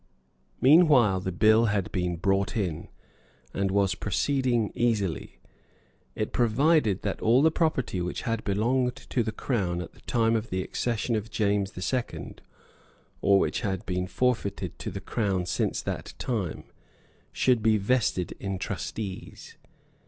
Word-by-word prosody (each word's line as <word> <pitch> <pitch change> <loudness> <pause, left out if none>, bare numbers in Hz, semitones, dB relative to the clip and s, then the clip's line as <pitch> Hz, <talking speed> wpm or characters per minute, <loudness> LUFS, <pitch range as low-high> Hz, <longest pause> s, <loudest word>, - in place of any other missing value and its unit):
Meanwhile 135 - +6
the 95 0 -3
bill 110 +5 +4
had 100 -4 -1
been 90 -1 -1
brought 100 +5 0
in, 90 -7 -2 0.7
and 100 0 0
was 100 -1 +2
proceeding 120 +2 0
easily. 105 -8 -1 0.8
It 110 - -3
provided 120 - +2
that 100 - -3
all 120 +5 +4
the 160 - +5
property 145 - 0
which 90 0 -4
had 115 -2 -2
belonged 125 +5 +1
to 125 - -2
the 110 -1 -2
Crown 95 -9 -1
at 90 - -6
the - - -20
time 115 -1 +1
of 110 +1 -2
the 95 0 -1
accession 115 +2 -1
of 110 +1 -3
James 100 -2 0
the 90 - -6
Second, 125 +4 -3 0.8
or 100 0 +5
which - - 0
had 95 0 -2
been 90 0 -2
forfeited 125 -3 -1
to - - -4
the - - -6
Crown 95 -5 -1
since - - -1
that - - -5
time, 105 -10 -3 0.7
should 125 -3 +2
be 110 0 +3
vested 105 -4 0
in 95 -1 -3
trustees. 95 +1 -6
105 Hz, 145 wpm, -27 LUFS, 95-120 Hz, 0.8 s, Meanwhile